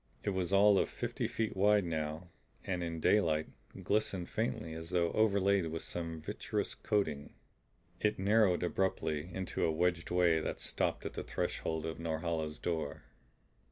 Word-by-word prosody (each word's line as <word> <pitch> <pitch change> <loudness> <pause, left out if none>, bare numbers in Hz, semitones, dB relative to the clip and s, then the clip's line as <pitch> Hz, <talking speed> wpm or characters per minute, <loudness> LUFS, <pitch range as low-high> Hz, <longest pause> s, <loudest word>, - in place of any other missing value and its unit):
It - - 0
was 95 -1 -1
all 100 0 +6
of - - +1
fifty - - -3
feet 110 -2 -2
wide 105 +1 +4
and 85 - -4
now, 80 +2 -3 0.3
in 85 -3 -2
daylight, 80 -4 +3 0.4
glistened 100 -4 0
faintly 110 -6 -2
as 80 +1 -7
though 85 -2 +1
overlaid 100 -4 +3
with 80 0 -4
some 85 -2 -4
vitreous - - -3
coating. 80 -9 -1 0.6
It 105 0 +1
narrowed 100 -2 +3
abruptly 90 -3 -1
into 95 +1 -2
a 80 - +3
wedged 85 +1 0
way 85 -2 +4
that - - -3
stopped - - -1
at - - -4
the - - -4
threshold 80 -1 -2
of 80 0 -4
Norhala's 80 -1 -2
door. 80 -4 -3
85 Hz, 155 wpm, -33 LUFS, 80-100 Hz, 0.6 s, all